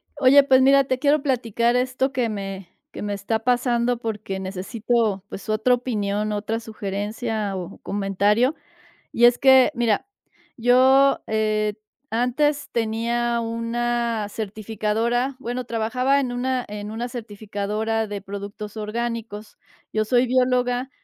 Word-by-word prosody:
Oye, 280 0 +6
pues 260 -1 +5
mira, 275 +1 +6
te 255 -1 -1
quiero 290 +1 +3
platicar 240 -3 +1
esto 255 +2 0
que 250 -4 0
me 195 -3 -6 0.2
que - - -8
me 205 0 -2
está 200 +3 -2
pasando 245 0 +1
porque 210 -4 -4
necesito 200 +2 -1
pues 195 - -8
otra 215 +4 +3
opinión, 210 -4 -2
otra 210 +2 -2
sugerencia 215 0 -4
o 180 -2 -6
comentario. 205 +7 +1 0.6
Y 240 - +3
es 240 0 +6
que 265 0 +6
mira, 235 - +1 0.5
yo, 260 +3 +5
eh, 215 -1 0 0.4
antes 280 +5 0
tenía 235 +1 0
una 230 -1 -1
certificadora, 220 +4 -2
bueno, 250 -1 -4
trabajaba 250 +4 +1
en 255 -3 -2
una 250 0 -1
en 210 0 -6
una 235 +3 -4
certificadora 215 -1 -3
de 205 -1 -5
productos 200 +2 -7
orgánicos, 220 -1 -4 0.4
yo 215 0 +1
soy 245 +3 +3
bióloga 250 0 +1
230 Hz, 130 wpm, -23 LUFS, 210-250 Hz, 0.6 s, Oye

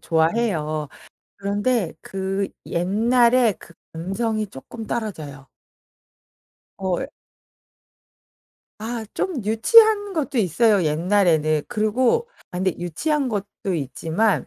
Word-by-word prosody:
좋아해요. 160 -3 0 0.5
그런데 205 0 0
그 195 +1 -3 0.2
옛날에 235 +6 +3
그 170 - -15 0.2
감성이 215 +6 -2
조금 220 - -9
떨어져요. 155 - -5 1.3
어 190 -2 -1
예. 265 - -3 1.7
아 225 +1 -4
좀 305 - -2
유치한 410 - +5
것도 290 -5 -2
있어요 205 +1 +3
옛날에는. 155 -2 +2
그리고 245 - +1 0.2
아 180 - -5
근데 185 -1 +1
유치한 270 - -1
것도 200 -3 -3
있지만 165 - 0
205 Hz, 210 characters per minute, -22 LUFS, 170-235 Hz, 1.7 s, 유치한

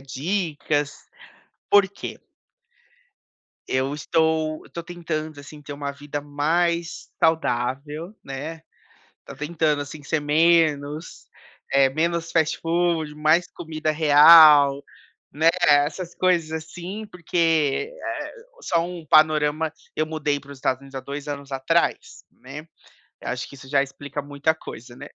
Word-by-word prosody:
dicas, 145 0 -2 0.7
por 205 -1 +6
quê? 200 - -8 1.5
Eu 130 +2 0
estou 160 +1 0
eu - - -18
tô 170 - -6
tentando, 160 -3 -5
assim, 145 +1 -11
ter 145 0 -8
uma 140 0 -4
vida 145 +1 -6
mais 165 +4 -1
saudável, 150 - -1
né. 150 +4 -7 0.6
Tô - - -11
tentando, 150 -1 0
assim, 145 +1 -10
ser 155 +3 -1
menos 155 0 +1 0.5
eh, 135 -1 +5
menos 165 +2 -1
fast 160 -1 +1
food, 165 -2 0
mais 155 +4 +2
comida 155 -2 -3
real, 150 -2 +7 0.5
né, 160 +3 +3 0.2
essas 150 +5 +2
coisas 175 -4 +1
assim. 175 +6 -6
Porque, 165 - 0
eh - - -5 0.3
só 170 -2 +1
um 175 -2 -8
panorama: 155 +1 +3 0.2
eu 155 - +1
mudei 150 -2 -2
para 140 - -16
os 140 - -13
Estados 130 0 -1
Unidos 135 0 -12
há - - -3
2 140 +2 -7
anos 140 -1 -6
atrás, 150 +6 -1
né. 140 +5 -11 0.5
Eu - - -7
acho 120 0 -4
que - - -13
isso 130 0 -13
já 140 0 +3
explica 140 +1 -6
muita 145 +2 -1
coisa, 120 -5 -11
né. - - -9
155 Hz, 135 wpm, -23 LUFS, 145-165 Hz, 1.5 s, real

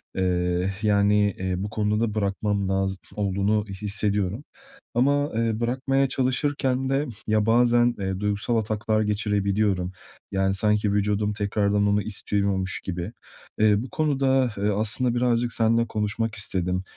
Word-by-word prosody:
eee, 90 0 0
yani, 105 0 +3
eee, 95 -1 -2
bu 100 +2 -3
konuda 105 +1 0
bırakmam 100 -1 -1
lazım 95 0 0 0.2
olduğunu 100 +1 0 0.2
hissediyorum. 105 +2 0 0.5
Ama, 145 +4 +2
eee, 115 -1 0
bırakmaya 135 +3 +1
çalışırken 130 0 0
de, 135 +2 +1 0.2
ya, 110 -1 +2
bazen, 120 +1 +4
eee, 95 -1 -2
duygusal 105 +3 0
ataklar 110 0 0
geçirebiliyorum, 100 -3 0 0.4
yani, 95 0 +1
sanki 105 +1 +1
vücudum 105 +1 0
tekrardan 105 0 +1
onu 100 0 +2
istiyormuş 100 -2 -1
gibi. 90 +2 -4 0.5
Eee, 105 -1 +4
bu 130 - -8
konuda, 135 -6 +1
eee, 100 +1 0
aslında 110 +4 0
birazcık 120 -1 +1
seninle 115 +1 +2
konuşmak 110 +1 -2
istedim. 90 -3 -2
105 Hz, 125 wpm, -25 LUFS, 100-115 Hz, 0.5 s, bazen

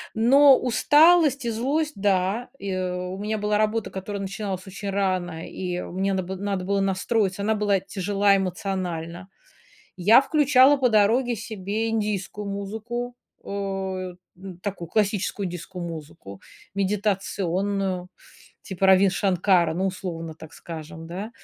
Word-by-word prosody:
но 270 +5 +6
усталость 295 +3 +4
и - - 0
злость- 285 +7 -1
да. 195 +4 0
И 200 -1 -4
у 180 0 -3
меня 210 +2 -2
была 210 0 0
работа, 215 +1 0
которая 200 +1 -5
начиналась 195 -1 -4
очень 200 +1 -6
рано, 185 -4 -1
и 180 -1 -4
мне 195 +2 -2
надо 190 -1 -1
было 190 +2 -6
надо 200 -2 -2
было 200 +1 +1
настроиться, 195 +1 0
она 215 +2 +1
была 205 -2 +2
тяжела 200 +1 +1
эмоционально. 180 -2 -4 0.7
Я 205 +7 +6
включала 285 -1 +5
по 260 -2 +2
дороге 230 +3 +3
себе 215 +1 -3
индийскую 210 -2 -2
музыку, 220 +5 -5 0.3
э, - - -12
н 190 -2 -5
такую 195 -5 -5
классическую 205 0 0
индийскую 175 +1 -6
музыку, 155 - -9 0.3
медитационную, 195 -2 -1 0.5
типа 190 -1 -1
Раввин 190 0 +6
Шанкара, 185 -3 +2
ну, 185 +3 0
условно 170 -4 -5
так 160 0 -13
скажем, 160 0 -9
да, 190 +6 -6
195 Hz, 130 wpm, -24 LUFS, 185-215 Hz, 0.7 s, но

